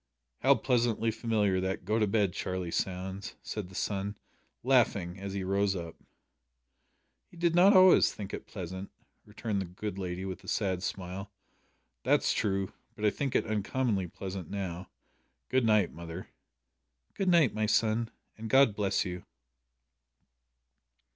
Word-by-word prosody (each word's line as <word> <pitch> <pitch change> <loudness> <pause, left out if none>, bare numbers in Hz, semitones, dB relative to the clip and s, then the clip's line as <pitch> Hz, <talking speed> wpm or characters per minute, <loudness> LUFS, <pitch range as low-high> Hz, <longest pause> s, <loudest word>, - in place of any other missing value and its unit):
"How - - +5
pleasantly 120 -3 +1
familiar 105 -4 +1
that 95 -1 -3
`Go 110 +4 +1
to 105 - +3
bed, 100 -3 +1
Charlie,' 90 -2 -3
sounds," 95 +2 -3
said 105 -4 -5
the 95 - -13
son, 100 +1 -2 0.5
laughing, 100 -8 +2
as 100 0 -5
he 95 - -2
rose 100 +1 +1
up. 85 -2 -6 1.3
"You 175 - -16
did 170 0 +2
not 190 +4 +6
always 185 -1 +7
think 100 -1 -7
it - - -6
pleasant," 95 0 -6 0.4
returned 105 -1 -2
the - - -3
good 100 +2 -5
lady, 90 0 -4
with 95 0 -6
a - - -14
sad 95 -5 0
smile. 95 +1 -5 0.7
"That's - - +3
true, 95 -2 -1 0.2
but 105 - -3
I 105 - +5
think 140 +2 -3
it - - +3
uncommonly 105 -1 0
pleasant 95 -1 -6
now. 95 -3 -4 0.6
Good 130 -2 +2
night, 105 -4 +3
mother." 85 +2 -8 0.8
"Good 195 -2 0
night, 170 -8 +5
my 110 0 0
son, 110 +1 +2 0.3
and 110 0 -5
God 130 -5 +5
bless 100 -1 +1
you." 90 -1 -5
100 Hz, 150 wpm, -30 LUFS, 95-110 Hz, 1.3 s, always